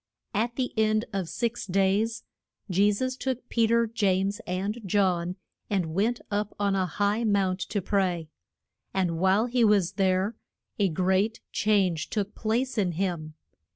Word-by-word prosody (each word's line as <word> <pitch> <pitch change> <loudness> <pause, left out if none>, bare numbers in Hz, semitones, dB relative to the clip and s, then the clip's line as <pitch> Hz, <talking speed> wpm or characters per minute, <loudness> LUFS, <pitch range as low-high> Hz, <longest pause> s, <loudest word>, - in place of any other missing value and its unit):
At 230 +3 0
the 255 -1 -2
end 215 +1 +2
of 190 -4 -2
six 235 -3 -2
days 195 +4 +1 0.5
Je 200 +3 +4
sus 255 +5 -1
took 255 -2 -3
Pe 230 -2 +3
ter, 235 +1 +3
James, 200 -3 0
and 195 +5 -2
John, 185 -2 +1 0.3
and 180 -6 -1
went 225 +7 +1
up 205 0 -1
on 200 -1 +2
a 190 -1 +1
high 205 +6 0
mount 195 -4 +1
to 205 -3 -1
pray. 180 -5 0 0.7
And 175 -4 0
while 190 +5 +3
he 245 0 +1
was 205 -5 +4
there 190 +2 +1 0.4
a 200 -2 +3
great 190 +6 +1
change 190 -7 +1
took 210 -1 -2
place 235 +2 -1
in 180 -4 +1
him. 165 -4 -3
200 Hz, 155 wpm, -27 LUFS, 185-220 Hz, 0.7 s, Je